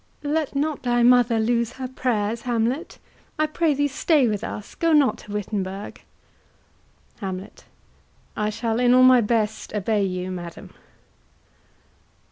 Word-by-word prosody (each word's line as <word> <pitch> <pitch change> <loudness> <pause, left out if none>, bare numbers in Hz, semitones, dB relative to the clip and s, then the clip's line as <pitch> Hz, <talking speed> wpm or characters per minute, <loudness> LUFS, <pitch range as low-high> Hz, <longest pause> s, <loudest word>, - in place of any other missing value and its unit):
Let 295 0 -1
not 295 +1 -1
thy 240 -1 +1
mother 245 -2 +4
lose 235 +1 0
her 260 -1 -5
prayers, 235 -4 -1
Hamlet. 245 +5 -2 0.4
I 310 - +2
pray 310 0 0
thee 290 +1 +1
stay 285 -1 +2
with 210 -1 -2
us; 210 -3 -6
go 330 -1 +1
not 270 -7 +3
to 205 - -12
Wittenberg. 200 -1 -4 1.2
HAMLET. 190 -2 -7 0.7
I 210 0 -1
shall 225 +1 -2
in 245 0 +4
all 255 - +6
my 255 -1 +7
best 220 -1 -1
obey 210 0 0
you, 185 -1 -3
madam. 175 -2 -8
235 Hz, 135 wpm, -23 LUFS, 210-260 Hz, 1.2 s, my